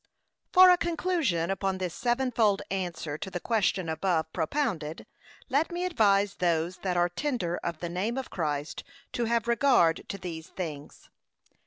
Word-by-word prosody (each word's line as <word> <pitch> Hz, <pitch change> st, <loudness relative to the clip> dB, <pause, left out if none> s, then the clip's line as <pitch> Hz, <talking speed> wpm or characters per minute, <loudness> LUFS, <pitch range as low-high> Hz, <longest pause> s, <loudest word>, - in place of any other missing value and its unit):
For 370 Hz, 0 st, +9 dB
a 355 Hz, -, +4 dB
conclusion 330 Hz, -, 0 dB
upon 195 Hz, 0 st, -1 dB
this 180 Hz, -2 st, -3 dB
sevenfold 240 Hz, -5 st, +1 dB
answer 170 Hz, -5 st, -3 dB
to 190 Hz, -, -5 dB
the 180 Hz, -, -4 dB
question 195 Hz, -4 st, 0 dB
above 160 Hz, -1 st, -1 dB
propounded, 165 Hz, -, -2 dB, 0.4 s
let 290 Hz, +6 st, +1 dB
me 350 Hz, +1 st, -2 dB
advise 205 Hz, -, +2 dB
those 170 Hz, 0 st, 0 dB
that 180 Hz, -2 st, -2 dB
are 175 Hz, 0 st, +4 dB
tender 180 Hz, -, -2 dB
of 170 Hz, -2 st, -5 dB
the 175 Hz, -, -3 dB
name 200 Hz, +8 st, -2 dB
of 265 Hz, -, -5 dB
Christ, 150 Hz, -3 st, -3 dB, 0.3 s
to 240 Hz, -, 0 dB
have 230 Hz, 0 st, 0 dB
regard 235 Hz, -9 st, +3 dB
to 200 Hz, -, -4 dB
these 165 Hz, -4 st, -7 dB
things. 150 Hz, -5 st, -7 dB
190 Hz, 155 wpm, -28 LUFS, 170-240 Hz, 0.4 s, For